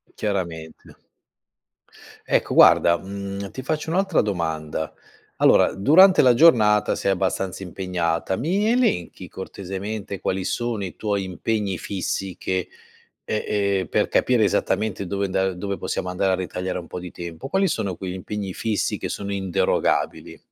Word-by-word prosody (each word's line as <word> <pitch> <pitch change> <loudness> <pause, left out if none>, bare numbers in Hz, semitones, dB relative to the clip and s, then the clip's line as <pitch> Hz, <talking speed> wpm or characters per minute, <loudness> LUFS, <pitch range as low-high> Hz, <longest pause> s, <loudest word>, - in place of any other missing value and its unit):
Chiaramente. 85 -6 -4 1.3
Ecco - - +1
guarda, 85 - +6
mhmm, 100 0 -6
ti 130 - -8
faccio 155 +3 -2
un'altra 190 +4 +2
domanda: 80 -6 -3 0.4
allora - - +5
durante 180 - +6
la 125 -2 +6
giornata 110 -8 +5
sei 100 - 0
abbastanza 95 0 -2
impegnata, 90 -1 -2
mi 190 - 0
elenchi, 235 - 0
cortesemente, 100 +2 -6
quali 95 +1 -2
sono 115 +1 -2
i 90 - -8
tuoi 100 -2 -1
impegni 95 +1 -2
fissi 95 -1 -3
che 95 -1 -2 0.6
ehm, 105 - -2 0.4
ehm, 95 - -4
per - - +1
capire - - +3
esattamente 105 -3 0
dove 100 +2 -2
anda 95 0 0
dove 100 +2 -4
possiamo 90 - -3
andare 95 +1 +1
a - - +3
ritagliare 90 0 -3
un 85 - -8
po' 90 - -6
di 90 0 -8
tempo. 85 +8 -8
Quali 190 +4 +2
sono 95 - -2
quegli 90 -1 -5
impegni 95 +1 -5
fissi 110 +2 -1
che - - -4
sono 100 0 -4
inderogabili? 95 -3 0
95 Hz, 145 wpm, -23 LUFS, 90-105 Hz, 1.3 s, guarda